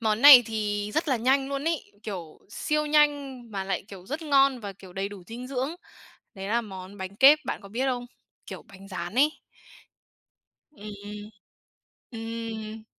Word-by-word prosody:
món 220 Hz, 0 st, 0 dB
này 280 Hz, -4 st, +11 dB
thì 210 Hz, -2 st, -2 dB
rất 315 Hz, 0 st, 0 dB
là 260 Hz, -, +3 dB
nhanh 270 Hz, +4 st, +2 dB
luôn 280 Hz, +1 st, -3 dB
ấy, 330 Hz, -2 st, -2 dB
kiểu 175 Hz, -7 st, -7 dB
siêu 300 Hz, +7 st, -1 dB
nhanh 290 Hz, -4 st, +2 dB
mà 195 Hz, -2 st, -3 dB
lại, 195 Hz, -, -2 dB
kiểu, 190 Hz, -2 st, -11 dB
rất 300 Hz, +4 st, -4 dB
ngon 275 Hz, -4 st, +3 dB
và, 200 Hz, -2 st, -6 dB
kiểu, 190 Hz, -1 st, -14 dB
đầy 195 Hz, +1 st, -3 dB
đủ 200 Hz, -2 st, -10 dB
dinh 240 Hz, +3 st, -7 dB
dưỡng. 270 Hz, +4 st, -2 dB, 0.6 s
Đấy 195 Hz, -2 st, -7 dB
là 235 Hz, +3 st, +1 dB
món 190 Hz, -2 st, -9 dB
bánh 190 Hz, +1 st, -6 dB
kếp, 280 Hz, +5 st, +7 dB
bạn -, -, -3 dB
có 200 Hz, -, -12 dB
biết 245 Hz, +6 st, -1 dB
không? 250 Hz, -2 st, -1 dB, 0.4 s
Kiểu -, -, -8 dB
bánh 195 Hz, -1 st, -14 dB
rán 180 Hz, +2 st, -6 dB
ấy. 290 Hz, +4 st, +5 dB, 1.4 s
Ừm, 210 Hz, -7 st, -9 dB
ừm, 210 Hz, 0 st, -8 dB, 1.2 s
ừm. 220 Hz, 0 st, -7 dB
225 Hz, 175 wpm, -27 LUFS, 200-275 Hz, 1.4 s, này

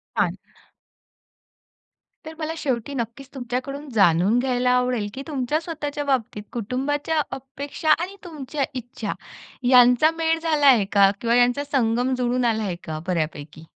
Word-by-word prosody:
छान. -, -, +1 dB, 1.9 s
तर 315 Hz, -, -7 dB
मला 315 Hz, 0 st, -3 dB
शेवटी 265 Hz, -2 st, -2 dB
नक्कीच 245 Hz, +3 st, -5 dB
तुमच्याकडून 265 Hz, +3 st, -4 dB
जाणून 195 Hz, +2 st, +4 dB
घ्यायला 250 Hz, -1 st, +1 dB
आवडेल, 250 Hz, -4 st, +1 dB
की 270 Hz, -, -6 dB
तुमच्या 290 Hz, 0 st, -1 dB
स्वतःच्या 295 Hz, -3 st, -4 dB
बाबतीत 230 Hz, -6 st, -1 dB
कुटुंबाच्या 285 Hz, +7 st, -1 dB
अपेक्षा 275 Hz, +3 st, -5 dB
आणि 370 Hz, +3 st, -4 dB
तुमच्या 300 Hz, -4 st, -4 dB
इच्छा 245 Hz, -1 st, -5 dB, 0.6 s
यांचा 250 Hz, +4 st, +6 dB
मेळ 325 Hz, 0 st, +1 dB
झाला 315 Hz, -3 st, +1 dB
आहे 230 Hz, -7 st, +6 dB
का? 200 Hz, -1 st, +6 dB
किंवा 235 Hz, 0 st, +2 dB
यांचा 245 Hz, +3 st, +3 dB
संगम 245 Hz, 0 st, +1 dB
जुळून 250 Hz, 0 st, 0 dB
आला 220 Hz, -2 st, +1 dB
आहे 190 Hz, -4 st, -2 dB
का 155 Hz, -1 st, -5 dB
बऱ्यापैकी? 155 Hz, -3 st, -3 dB
250 Hz, 135 wpm, -23 LUFS, 230-290 Hz, 1.9 s, यांचा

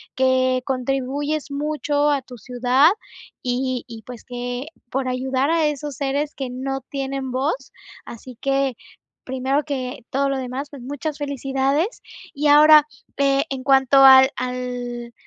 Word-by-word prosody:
que 260 Hz, 0 st, +2 dB
contribuyes 270 Hz, +3 st, -2 dB
mucho 295 Hz, 0 st, 0 dB
a 280 Hz, -2 st, +1 dB
tu 250 Hz, -1 st, -12 dB
ciudad, 250 Hz, +5 st, +3 dB, 0.5 s
y 255 Hz, 0 st, -1 dB
y 230 Hz, -2 st, -9 dB
pues, 245 Hz, -2 st, -10 dB
que 245 Hz, +2 st, -5 dB, 0.2 s
por 265 Hz, +1 st, -2 dB
ayudar 260 Hz, +2 st, 0 dB
a 330 Hz, -2 st, +2 dB
esos 295 Hz, -1 st, -4 dB
seres 285 Hz, +2 st, -2 dB
que 265 Hz, -2 st, -5 dB
no 270 Hz, +2 st, -4 dB
tienen 270 Hz, -1 st, -4 dB
voz. 270 Hz, +1 st, -2 dB, 0.3 s
Así 245 Hz, +2 st, -10 dB
que, 275 Hz, -1 st, +1 dB, 0.5 s
primero 265 Hz, +3 st, -1 dB
que 255 Hz, -4 st, -5 dB
todo 275 Hz, +1 st, 0 dB
lo 275 Hz, -, -1 dB
demás, 260 Hz, +3 st, -5 dB
pues, 280 Hz, -4 st, -11 dB
muchas 290 Hz, +3 st, -5 dB
felicidades. 280 Hz, -, -1 dB, 0.3 s
Y 295 Hz, +2 st, 0 dB
ahora, 300 Hz, +1 st, +8 dB, 0.3 s
eh, 275 Hz, 0 st, +2 dB
en 265 Hz, -1 st, -5 dB
cuanto 270 Hz, 0 st, +4 dB
al 265 Hz, 0 st, +9 dB
al, 245 Hz, -1 st, -5 dB
270 Hz, 140 wpm, -22 LUFS, 255-285 Hz, 0.5 s, al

